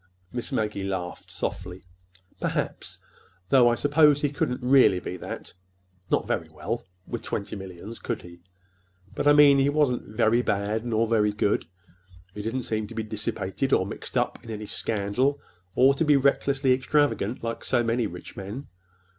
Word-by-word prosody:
Miss 120 -1 -4
Maggie 105 -2 -1
laughed 95 -2 -4
softly. 90 -1 -5 0.6
"Perhaps—though 95 +7 -1
I 120 - +2
suppose 145 +1 +4
he 145 -1 0
couldn't 125 -3 -2
really 125 -7 +5
be 90 - -5
that—not 90 0 -6
very 80 - -2
well—with 90 +3 -6
twenty 100 - -4
millions, 95 +3 -8
could 115 -3 -4
he? 85 0 -12 0.7
But - - -1
I 145 - +8
mean, 145 -2 +7
he 135 +1 +3
wasn't 130 -7 0
very 115 +1 +4
bad, 105 +1 -1
nor 115 -1 +2
very 110 -2 +2
good. 105 0 0 0.7
He 105 - -6
didn't 115 +4 -2
seem 110 -2 -2
to - - -11
be 110 - -2
dissipated, 110 +3 -2
or 95 - +4
mixed 100 - -6
up - - -1
in - - -11
any 105 -1 -5
scandal, 115 +8 0 0.4
or 135 +2 +6
to 140 - 0
be 150 -2 +5
recklessly 135 -1 +2
extravagant, 130 -4 +1
like 115 0 -4
so 120 - +1
many 115 0 +1
rich 90 -2 -10
men. 105 +9 -7
110 Hz, 155 wpm, -26 LUFS, 95-130 Hz, 0.7 s, I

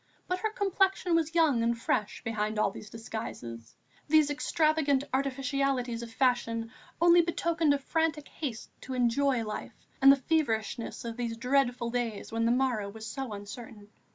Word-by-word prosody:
But 365 0 -1
her 435 - 0
complexion 385 -3 +1
was 330 0 +1
young 305 -8 +4
and 230 0 0
fresh 210 -2 -1
behind 215 -2 -2
all 210 - +2
these 210 - -10
disguises; 120 - -7 0.3
these 305 -1 +4
extravagant 305 -2 +2
artificialities 270 -2 0
of 235 -1 -8
fashion 230 -2 0 0.3
only 345 +1 +7
betokened 330 -2 +1
a 285 - +3
frantic 310 +1 -1
haste 255 -8 -6
to 260 - -5
enjoy 250 0 +2
life 210 0 -7 0.2
and 275 +1 +9
the - - +7
feverishness 240 -6 -1
of 230 0 -5
these 235 -2 -3
dreadful 250 -1 +1
days 235 -4 -3
when 230 0 0
the - - +3
morrow 245 -5 +1
was 220 +2 -9
so 260 +2 -5
uncertain. 205 +1 -9
250 Hz, 155 wpm, -29 LUFS, 225-295 Hz, 0.3 s, and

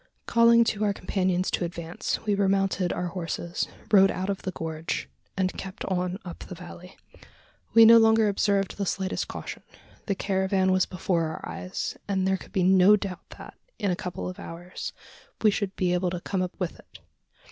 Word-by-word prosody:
Calling 235 0 +6
to 215 -2 -1
our 205 -1 +2
companions 185 -1 0
to - - 0
advance, 170 +2 -4
we 210 - +2
remounted 195 -2 +1
our 180 - -2
horses, 170 0 -3 0.2
rode 195 -2 +7
out 190 +1 -2
of 195 - -4
the - - -3
gorge, 160 -1 -4 0.3
and 185 -1 0
kept 190 0 -6
on 180 -1 -1
up 175 - -8
the 180 - -8
valley. 180 +1 -11 0.8
We 230 0 +10
no 230 +1 +9
longer 220 -1 +5
observed 200 -1 +1
the 200 -2 -2
slightest 190 +1 -2
caution. - - -7 0.5
The 200 - +1
caravan 190 -1 +1
was 185 0 +3
before 180 -2 0
our 155 - -6
eyes; 185 - -5
and 190 -2 0
there 190 0 +2
could - - -14
be 185 - +1
no 190 +2 +6
doubt 195 -3 -6
that, - - -10 0.2
in 200 -3 0
a - - +1
couple 180 0 -5
of 180 - -7
hours, 175 +2 -7 0.5
we 215 - +6
should 200 -1 -2
be 180 -1 +1
able 180 0 +1
to 175 0 -4
come 190 0 -2
up 180 +2 -4
with 180 -3 -3
it. - - -16
190 Hz, 190 wpm, -26 LUFS, 180-200 Hz, 0.8 s, We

